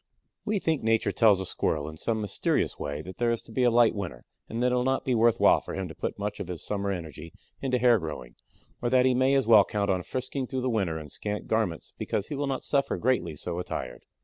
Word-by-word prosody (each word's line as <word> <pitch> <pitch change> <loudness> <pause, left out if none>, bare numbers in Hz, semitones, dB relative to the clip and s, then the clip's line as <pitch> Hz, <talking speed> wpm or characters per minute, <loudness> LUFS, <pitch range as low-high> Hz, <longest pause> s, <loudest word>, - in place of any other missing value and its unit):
We 210 0 0
think 160 -5 0
Nature 115 0 +2
tells 110 -4 +5
the 95 - -4
Squirrel 75 -4 -1
in 80 - -7
some 110 +7 -1
mysterious 105 - -1
way 75 +1 -4
that 95 +3 -9
there 120 -1 +1
is 115 -1 0
to - - -15
be 130 - -1
a 125 - +5
light 120 -1 +5
winter 95 - -6 0.2
and 115 +2 -2
that 125 - +3
it - - +2
will 125 - +1
not 130 +1 0
be 130 - +1
worth 115 0 +3
while - - +5
for - - -7
him 95 -1 -3
to - - -8
put - - -4
much 105 0 -4
of 90 - -4
his 90 -2 -6
summer 100 -1 -2
energy 85 -3 -6 0.3
into 130 -2 +1
hair 120 -2 +5
growing, 75 -7 -6 0.5
or 120 - 0
that 130 0 +4
he 130 - +4
may 130 +2 +3
as 135 - +2
well 110 -3 +7
count 100 0 -1
on 90 -1 0
frisking 130 +5 -4
through 130 0 -3
the 130 0 0
winter 95 -8 0
in 75 -2 -8
scant 105 0 -4
garments 110 -8 -1
because 105 - -2
he 150 - -3
will 140 0 -2
not 135 -1 -2
suffer 140 -1 0
greatly 125 -9 0
so 85 +4 -4
attired. 60 -8 -5
110 Hz, 255 wpm, -27 LUFS, 90-125 Hz, 0.5 s, well